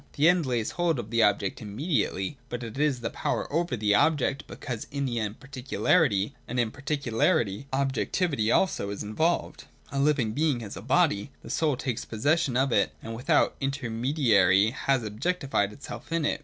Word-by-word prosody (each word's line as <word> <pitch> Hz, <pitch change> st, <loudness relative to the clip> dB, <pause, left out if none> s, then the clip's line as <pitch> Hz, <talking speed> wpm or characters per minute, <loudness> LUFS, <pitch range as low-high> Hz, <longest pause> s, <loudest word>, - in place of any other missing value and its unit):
The 150 Hz, +3 st, +3 dB
End 175 Hz, -4 st, +3 dB
lays 120 Hz, -4 st, -1 dB
hold 175 Hz, -3 st, 0 dB
of 110 Hz, -2 st, -6 dB
the 115 Hz, 0 st, +2 dB
object 100 Hz, -2 st, +1 dB
immediately, 110 Hz, -, -1 dB
because 120 Hz, -1 st, -5 dB
it 115 Hz, -, -8 dB
is 145 Hz, -5 st, +1 dB
the -, -, -3 dB
power -, -, -2 dB
over 165 Hz, -5 st, 0 dB
the 105 Hz, -1 st, +2 dB
object, 140 Hz, +2 st, +2 dB
because 125 Hz, -6 st, -6 dB
in 140 Hz, 0 st, -2 dB
the 120 Hz, -3 st, -1 dB
End 110 Hz, 0 st, -4 dB
particularity, 135 Hz, -, +1 dB
and 125 Hz, +1 st, -2 dB
in 115 Hz, -2 st, +1 dB
particularity 140 Hz, -, 0 dB
objectivity 135 Hz, -, 0 dB
also, 185 Hz, -, +1 dB
is 100 Hz, -, -4 dB
involved.— 155 Hz, +12 st, -1 dB, 0.3 s
A 140 Hz, -, -2 dB
living 140 Hz, -6 st, +2 dB
being 145 Hz, -1 st, 0 dB
has 105 Hz, -3 st, -7 dB
a -, -, -7 dB
body; 130 Hz, -, +2 dB
the -, -, -7 dB
soul 150 Hz, -5 st, +1 dB
takes 125 Hz, -3 st, -3 dB
possession 135 Hz, +3 st, +1 dB
of 135 Hz, 0 st, +2 dB
it -, -, +2 dB
and 115 Hz, -, -6 dB
with 125 Hz, +4 st, -10 dB
out -, -, +4 dB
intermediary 115 Hz, -, +2 dB
has 135 Hz, 0 st, 0 dB
objectified 115 Hz, -, -1 dB
itself 120 Hz, +2 st, -9 dB
in 165 Hz, -2 st, +1 dB
it. -, -, 0 dB
130 Hz, 180 wpm, -27 LUFS, 110-145 Hz, 0.3 s, out